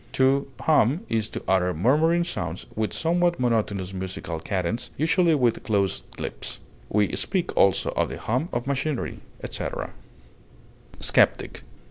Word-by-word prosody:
To 135 Hz, +1 st, +3 dB
hum 150 Hz, -, +3 dB
is 110 Hz, -1 st, 0 dB
to -, -, -6 dB
utter 90 Hz, -2 st, +2 dB
murmuring 155 Hz, -, +3 dB
sounds 90 Hz, -, -4 dB
with 110 Hz, -3 st, -1 dB
somewhat 175 Hz, -, +1 dB
monotonous 105 Hz, -6 st, 0 dB
musical 95 Hz, -3 st, -5 dB
cadence, 100 Hz, +6 st, -2 dB
usually 165 Hz, +2 st, +3 dB
with 125 Hz, -5 st, +2 dB
closed 100 Hz, -3 st, -1 dB
lips; -, -, -5 dB, 0.3 s
we 105 Hz, -1 st, +1 dB
speak 180 Hz, -2 st, -1 dB
also 95 Hz, -2 st, +3 dB
of -, -, 0 dB
the -, -, -5 dB
hum 130 Hz, +10 st, -1 dB
of 120 Hz, +1 st, -2 dB
machinery, 140 Hz, 0 st, -2 dB, 0.2 s
etc. -, -, -3 dB, 1.1 s
SKEPTIC. -, -, +2 dB
120 Hz, 130 wpm, -25 LUFS, 95-155 Hz, 1.1 s, To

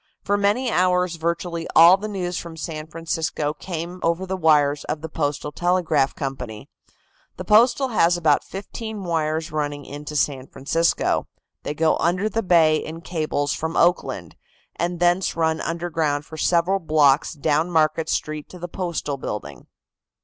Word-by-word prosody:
For 205 Hz, -, +1 dB
many 205 Hz, +5 st, +1 dB
hours 180 Hz, -1 st, +2 dB
virtually 170 Hz, 0 st, -2 dB
all 170 Hz, +3 st, +9 dB
the 205 Hz, +2 st, -5 dB
news 180 Hz, -4 st, -3 dB
from 170 Hz, -1 st, -6 dB
San 155 Hz, -1 st, -5 dB
Francisco 160 Hz, -2 st, -2 dB
came 170 Hz, +3 st, -6 dB
over 170 Hz, +3 st, 0 dB
the 190 Hz, 0 st, -3 dB
wires 150 Hz, -4 st, +3 dB
of 150 Hz, -, -3 dB
the 160 Hz, -, -6 dB
Postal 150 Hz, -1 st, -2 dB
Telegraph 170 Hz, -5 st, +1 dB
Company. 125 Hz, -6 st, -6 dB, 0.7 s
The 185 Hz, -, -6 dB
Postal 240 Hz, +6 st, +4 dB
has 175 Hz, -6 st, +3 dB
about 155 Hz, -4 st, +3 dB
fifteen 210 Hz, +1 st, -7 dB
wires 160 Hz, -1 st, -1 dB
running 145 Hz, -1 st, -3 dB
into 145 Hz, +1 st, -8 dB
San 135 Hz, -3 st, 0 dB
Francisco. 165 Hz, +5 st, 0 dB, 0.3 s
They 150 Hz, -, -4 dB
go 160 Hz, +1 st, +2 dB
under 180 Hz, +5 st, +1 dB
the 225 Hz, -, -1 dB
bay 165 Hz, -5 st, +4 dB
in 160 Hz, +2 st, -6 dB
cables 155 Hz, -4 st, -1 dB
from 160 Hz, +1 st, -3 dB
Oakland, 175 Hz, +1 st, +1 dB, 0.4 s
and 175 Hz, 0 st, -2 dB
thence 175 Hz, +2 st, +2 dB
run 160 Hz, -1 st, 0 dB
underground 160 Hz, -4 st, -1 dB
for 160 Hz, -, -10 dB
several 175 Hz, +4 st, +2 dB
blocks 150 Hz, -4 st, +3 dB
down 155 Hz, +3 st, +1 dB
Market 160 Hz, -1 st, +1 dB
Street 155 Hz, -1 st, -3 dB
to 180 Hz, -, -11 dB
the 175 Hz, 0 st, -6 dB
Postal 170 Hz, -5 st, -3 dB
building. 75 Hz, -, -6 dB
165 Hz, 155 wpm, -23 LUFS, 150-180 Hz, 0.7 s, all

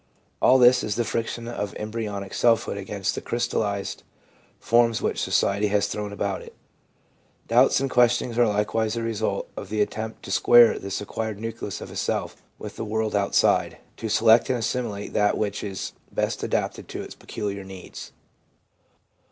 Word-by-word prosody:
All 130 Hz, -, +6 dB
this 125 Hz, 0 st, +6 dB
is 105 Hz, -1 st, -2 dB
the 120 Hz, -, 0 dB
friction 115 Hz, +1 st, -3 dB
of 105 Hz, -5 st, -4 dB
embryonic 105 Hz, -3 st, -5 dB
selfhood 115 Hz, -2 st, +2 dB
against 100 Hz, -1 st, -3 dB
the -, -, -5 dB
crystallised 105 Hz, -4 st, -2 dB, 0.6 s
forms 115 Hz, 0 st, +3 dB
which -, -, -1 dB
society 100 Hz, +1 st, +1 dB
has 100 Hz, 0 st, +2 dB
thrown 105 Hz, -1 st, -4 dB
about 100 Hz, -1 st, -2 dB
it. -, -, -13 dB, 0.9 s
Doubts 125 Hz, +3 st, +4 dB
and 135 Hz, -, 0 dB
questionings 120 Hz, -1 st, +2 dB
are 120 Hz, 0 st, +4 dB
likewise 110 Hz, +2 st, 0 dB
the 115 Hz, -, -2 dB
result 110 Hz, -3 st, -2 dB
of 100 Hz, -, -7 dB
the 110 Hz, 0 st, -2 dB
attempt 110 Hz, +1 st, -2 dB
to -, -, -7 dB
square 115 Hz, +4 st, +6 dB
this 100 Hz, 0 st, -4 dB
acquired 110 Hz, 0 st, -4 dB
nucleus 115 Hz, -2 st, -5 dB
of -, -, -8 dB
a -, -, -10 dB
self -, -, -2 dB, 0.2 s
with -, -, -9 dB
the -, -, -3 dB
world 110 Hz, 0 st, -1 dB
outside, 100 Hz, -1 st, +2 dB, 0.2 s
to 110 Hz, -, -4 dB
select 115 Hz, +2 st, +5 dB
and 130 Hz, -, +2 dB
assimilate 115 Hz, -3 st, -3 dB
that 105 Hz, 0 st, +2 dB
which 105 Hz, -1 st, -2 dB
is 100 Hz, -2 st, -5 dB, 0.2 s
best -, -, -1 dB
adapted -, -, -2 dB
to -, -, -6 dB
its -, -, -9 dB
peculiar 100 Hz, -2 st, -5 dB
needs. 95 Hz, -1 st, -10 dB
110 Hz, 165 wpm, -25 LUFS, 100-115 Hz, 0.9 s, All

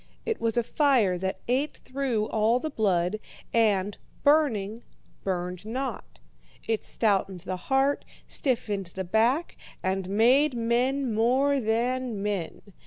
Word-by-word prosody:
It 450 Hz, -1 st, -2 dB
was 230 Hz, 0 st, 0 dB
a 240 Hz, -, +3 dB
fire 245 Hz, -9 st, +3 dB
that 190 Hz, +1 st, -3 dB
ate 265 Hz, +5 st, 0 dB
through 255 Hz, -5 st, -1 dB
all 220 Hz, +2 st, +2 dB
the 310 Hz, +4 st, -4 dB
blood, 195 Hz, -3 st, +1 dB, 0.3 s
and, 205 Hz, -3 st, +2 dB, 0.2 s
burning, 235 Hz, -8 st, +2 dB, 0.4 s
burned 180 Hz, -1 st, -3 dB
not. 245 Hz, -, -5 dB, 0.5 s
It 225 Hz, -1 st, 0 dB
stoutened 195 Hz, -4 st, 0 dB
the 185 Hz, +1 st, -4 dB
heart, 270 Hz, +1 st, +2 dB, 0.2 s
stiffened 215 Hz, -, -1 dB
the 190 Hz, -, -2 dB
back, 230 Hz, -, +1 dB, 0.3 s
and 190 Hz, 0 st, -1 dB
made 250 Hz, +7 st, +4 dB
men 245 Hz, +2 st, +1 dB
more 260 Hz, +6 st, +3 dB
than 235 Hz, -1 st, -1 dB
men. 200 Hz, -5 st, -3 dB
225 Hz, 125 wpm, -27 LUFS, 200-260 Hz, 0.5 s, made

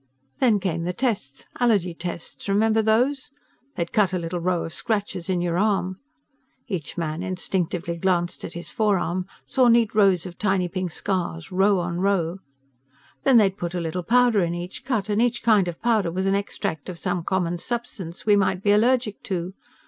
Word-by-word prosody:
"Then 230 Hz, -6 st, +4 dB
came 170 Hz, -3 st, -2 dB
the 180 Hz, -, -1 dB
tests, 200 Hz, -, -2 dB
allergy 205 Hz, -8 st, +2 dB
tests. 170 Hz, +3 st, -6 dB
Remember 220 Hz, +2 st, +3 dB
those? 250 Hz, +6 st, +1 dB, 0.5 s
They'd 170 Hz, -1 st, -3 dB
cut 195 Hz, -4 st, +3 dB
a -, -, +1 dB
little 175 Hz, 0 st, -3 dB
row 175 Hz, 0 st, 0 dB
of 165 Hz, -, -6 dB
scratches 200 Hz, -5 st, -2 dB
in 180 Hz, -2 st, +1 dB
your 175 Hz, 0 st, 0 dB
arm 195 Hz, -3 st, 0 dB, 0.3 s
..." -, -, -41 dB, 0.3 s
Each 180 Hz, -, -4 dB
man 160 Hz, -1 st, -2 dB
instinctively 180 Hz, -2 st, -2 dB
glanced 175 Hz, -1 st, 0 dB
at -, -, -6 dB
his 170 Hz, -, -6 dB
forearm, 185 Hz, -4 st, 0 dB, 0.2 s
saw 255 Hz, -2 st, +3 dB
neat 230 Hz, -2 st, +4 dB
rows 195 Hz, -5 st, +4 dB
of 175 Hz, -2 st, -9 dB
tiny 190 Hz, -3 st, +1 dB
pink 185 Hz, +1 st, -3 dB
scars, 170 Hz, -2 st, -3 dB
row 195 Hz, +2 st, +3 dB
on 175 Hz, -1 st, -2 dB
row. 190 Hz, -2 st, 0 dB, 0.9 s
"Then 265 Hz, -3 st, +6 dB
they'd 195 Hz, -3 st, +4 dB
put 175 Hz, +1 st, -3 dB
a -, -, 0 dB
little 170 Hz, +2 st, -3 dB
powder 240 Hz, +1 st, +4 dB
in 170 Hz, -1 st, 0 dB
each 175 Hz, +2 st, -6 dB
cut 225 Hz, -7 st, -1 dB
and 210 Hz, +1 st, +1 dB
each 240 Hz, -2 st, +1 dB
kind 210 Hz, -5 st, +4 dB
of 170 Hz, -1 st, -5 dB
powder 220 Hz, -7 st, +2 dB
was 185 Hz, +3 st, -2 dB
an 195 Hz, -, +2 dB
extract 195 Hz, -6 st, -3 dB
of 180 Hz, -, -6 dB
some 175 Hz, -1 st, -2 dB
common 175 Hz, -1 st, -1 dB
substance 195 Hz, -6 st, -5 dB
we 210 Hz, -1 st, +5 dB
might 195 Hz, -1 st, +1 dB
be 205 Hz, -, +4 dB
allergic 230 Hz, 0 st, +2 dB
to. 180 Hz, -1 st, -3 dB
190 Hz, 185 wpm, -24 LUFS, 175-210 Hz, 0.9 s, Then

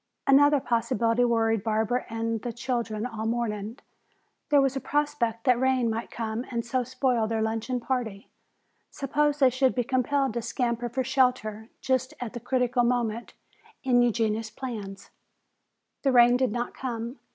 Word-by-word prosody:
Another 290 Hz, +1 st, +5 dB
possibility 230 Hz, -1 st, +1 dB
worried 225 Hz, -3 st, +2 dB
Barbara 220 Hz, +3 st, 0 dB
and 225 Hz, -1 st, -2 dB
the 240 Hz, -, -4 dB
children 235 Hz, -2 st, -3 dB
all 225 Hz, -3 st, -4 dB
morning. 225 Hz, -1 st, -2 dB, 0.7 s
There 290 Hz, -1 st, +5 dB
was 270 Hz, -1 st, +2 dB
a -, -, -1 dB
prospect 290 Hz, -6 st, -1 dB
that 250 Hz, -2 st, +3 dB
rain 260 Hz, -3 st, +2 dB
might 225 Hz, +1 st, -4 dB
come 225 Hz, 0 st, -3 dB
and 235 Hz, -2 st, -3 dB
so 250 Hz, +2 st, 0 dB
spoil 255 Hz, -2 st, 0 dB
their 220 Hz, 0 st, -1 dB
luncheon 225 Hz, +3 st, -2 dB
party. 235 Hz, -6 st, -3 dB, 0.6 s
Suppose 295 Hz, +1 st, 0 dB
they 265 Hz, -3 st, +5 dB
should 260 Hz, +1 st, +2 dB
be 245 Hz, -, +1 dB
compelled 265 Hz, +1 st, 0 dB
to 235 Hz, -, -2 dB
scamper 235 Hz, +1 st, -2 dB
for 260 Hz, +3 st, -1 dB
shelter 250 Hz, -4 st, 0 dB
just 260 Hz, +2 st, 0 dB
at 245 Hz, -3 st, -5 dB
the 240 Hz, -, -5 dB
critical 245 Hz, 0 st, +1 dB
moment 235 Hz, -2 st, -1 dB, 0.5 s
in 250 Hz, -2 st, +4 dB
Eugenia's 225 Hz, -2 st, 0 dB
plans? 215 Hz, -7 st, -7 dB, 0.9 s
The 275 Hz, -, +2 dB
rain 245 Hz, -1 st, +6 dB
did 255 Hz, -2 st, +1 dB
not 240 Hz, +2 st, -3 dB
come. 235 Hz, -1 st, -5 dB
240 Hz, 155 wpm, -27 LUFS, 225-260 Hz, 0.9 s, rain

